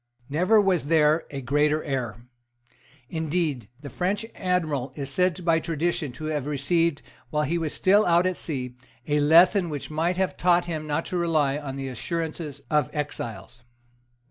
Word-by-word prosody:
Never 180 Hz, +9 st, +4 dB
was 185 Hz, -7 st, +2 dB
there 155 Hz, 0 st, +3 dB
a 140 Hz, -1 st, -5 dB
greater 145 Hz, +4 st, +1 dB
error. 120 Hz, -6 st, -3 dB, 0.8 s
Indeed 160 Hz, -, -2 dB
the 145 Hz, -, -7 dB
French 195 Hz, +4 st, -1 dB
admiral 155 Hz, -8 st, -1 dB
is 140 Hz, -2 st, -4 dB
said 180 Hz, +1 st, 0 dB
by 165 Hz, -1 st, +4 dB
tradition 165 Hz, -2 st, -1 dB
to 155 Hz, -, -8 dB
have 150 Hz, -3 st, -2 dB
received, 150 Hz, +2 st, +1 dB, 0.3 s
while 150 Hz, 0 st, 0 dB
he 170 Hz, +4 st, 0 dB
was 160 Hz, -2 st, -2 dB
still 200 Hz, +3 st, +4 dB
out 175 Hz, +1 st, +4 dB
at 185 Hz, 0 st, +1 dB
sea, 125 Hz, -7 st, -3 dB, 0.3 s
a 150 Hz, 0 st, +1 dB
lesson 170 Hz, +5 st, +5 dB
which 150 Hz, 0 st, -5 dB
might 165 Hz, +4 st, 0 dB
have 190 Hz, 0 st, -1 dB
taught 175 Hz, 0 st, +3 dB
him 155 Hz, -3 st, -4 dB
not 150 Hz, +2 st, -1 dB
to -, -, +1 dB
rely 155 Hz, -5 st, +1 dB
on 135 Hz, -3 st, -6 dB
the 135 Hz, 0 st, -4 dB
assurances 155 Hz, +1 st, -4 dB
of 150 Hz, -4 st, +1 dB
exiles. 120 Hz, -, -5 dB
155 Hz, 165 wpm, -25 LUFS, 140-175 Hz, 0.8 s, lesson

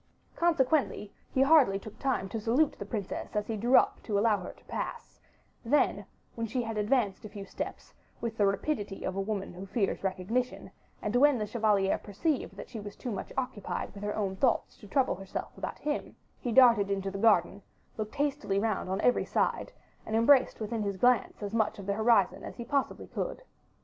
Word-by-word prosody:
Consequently, 300 Hz, -9 st, +1 dB, 0.2 s
he 265 Hz, -, +3 dB
hardly 275 Hz, -9 st, +5 dB
took 210 Hz, +2 st, -11 dB
time 265 Hz, -8 st, 0 dB
to 225 Hz, +3 st, -4 dB
salute 255 Hz, +8 st, +3 dB
the 200 Hz, -, -5 dB
princess 205 Hz, -2 st, -4 dB
as 210 Hz, 0 st, 0 dB
he 225 Hz, -, -3 dB
drew 240 Hz, +5 st, +4 dB
up -, -, +2 dB
to 210 Hz, -3 st, -1 dB
allow 210 Hz, 0 st, +3 dB
her 180 Hz, -, -7 dB
to -, -, -22 dB
pass; -, -, -5 dB, 0.4 s
then 285 Hz, +5 st, +2 dB, 0.3 s
when 230 Hz, -1 st, -3 dB
she 245 Hz, +3 st, -1 dB
had 225 Hz, -1 st, -4 dB
advanced 210 Hz, -2 st, +1 dB
a 215 Hz, -, -7 dB
few 200 Hz, -1 st, -8 dB
steps, 185 Hz, -, -6 dB, 0.3 s
with 230 Hz, -1 st, -3 dB
the 205 Hz, -2 st, +3 dB
rapidity 200 Hz, -1 st, -2 dB
of 190 Hz, -, -2 dB
a 195 Hz, -, 0 dB
woman 195 Hz, -2 st, -3 dB
who 185 Hz, +2 st, -8 dB
fears 200 Hz, -2 st, -1 dB
recognition, 195 Hz, +7 st, -2 dB, 0.3 s
and 210 Hz, +3 st, -1 dB
when 285 Hz, +1 st, +5 dB
the 210 Hz, -, -1 dB
chevalier 210 Hz, -3 st, +2 dB
perceived 260 Hz, -, -2 dB
that -, -, -7 dB
she 230 Hz, -, -7 dB
was 205 Hz, -1 st, -8 dB
too 245 Hz, -, -5 dB
much 200 Hz, -, -5 dB
occupied 250 Hz, -6 st, -3 dB
with 200 Hz, -, -10 dB
her 210 Hz, 0 st, -2 dB
own 195 Hz, -3 st, -1 dB
thoughts 240 Hz, +3 st, +1 dB
to 205 Hz, -, -14 dB
trouble 270 Hz, +3 st, +2 dB
herself 195 Hz, +1 st, -6 dB
about -, -, -5 dB
him, 295 Hz, 0 st, -3 dB, 0.2 s
he 245 Hz, -, -3 dB
darted 230 Hz, -5 st, +6 dB
into 195 Hz, -1 st, -1 dB
the 195 Hz, -, -5 dB
garden, 200 Hz, -3 st, +3 dB, 0.3 s
looked 215 Hz, -1 st, -5 dB
hastily 285 Hz, -8 st, 0 dB
round 205 Hz, -2 st, 0 dB
on 190 Hz, +1 st, -1 dB
every 245 Hz, -, +3 dB
side, -, -, 0 dB, 0.3 s
and 220 Hz, -, -3 dB
embraced 255 Hz, +4 st, +5 dB
within 220 Hz, +1 st, -3 dB
his 200 Hz, -2 st, -2 dB
glance 245 Hz, -1 st, +2 dB
as 205 Hz, +1 st, -4 dB
much 220 Hz, -2 st, +1 dB
of 200 Hz, -, -8 dB
the 200 Hz, -, 0 dB
horizon 220 Hz, -2 st, +3 dB
as -, -, -7 dB
he 235 Hz, -, -7 dB
possibly 275 Hz, +2 st, -1 dB
could. -, -, -4 dB
215 Hz, 200 wpm, -30 LUFS, 200-250 Hz, 0.4 s, darted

